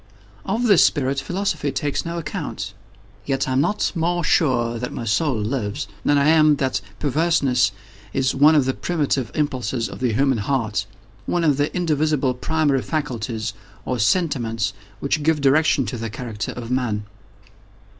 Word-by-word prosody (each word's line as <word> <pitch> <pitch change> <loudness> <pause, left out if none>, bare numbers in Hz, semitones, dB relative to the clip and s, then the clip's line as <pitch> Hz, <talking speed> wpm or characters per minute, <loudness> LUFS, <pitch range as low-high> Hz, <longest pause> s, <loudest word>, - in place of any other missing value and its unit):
Of 230 +2 0
this 205 -8 +6
spirit 135 -2 +1
philosophy 165 -1 -2
takes 145 +4 -2
no 170 0 -3
account. 155 -3 -5 0.5
Yet 135 +6 -1
I - - -1
am 130 +1 +3
not 210 +7 0
more 175 0 0
sure 120 -7 +2
that 125 - -4
my 120 - -5
soul 130 +6 +1
lives, 105 -2 -2 0.2
than 145 - +3
I 140 - +3
am 155 -1 +5
that 135 -2 -1 0.2
perverseness 140 -6 +2 0.4
is 135 0 +1
one 150 +4 +5
of 145 -4 +4
the 130 - +1
primitive 140 -8 -1
impulses 130 -5 -1
of - - -9
the 125 -3 0
human 135 0 +2
heart—one 110 - -3
of 150 -4 +3
the 145 +1 0
indivisible 155 -6 +1
primary 145 +1 +1
faculties, 115 -8 -3 0.3
or 125 -2 -2
sentiments, 115 - +1 0.3
which 145 +2 0
give 155 +1 +2
direction 140 -1 +3
to 115 +4 -4
the 115 0 -3
character 110 -2 -5
of 120 0 -7
Man. 115 -5 -1
135 Hz, 155 wpm, -22 LUFS, 120-155 Hz, 0.5 s, this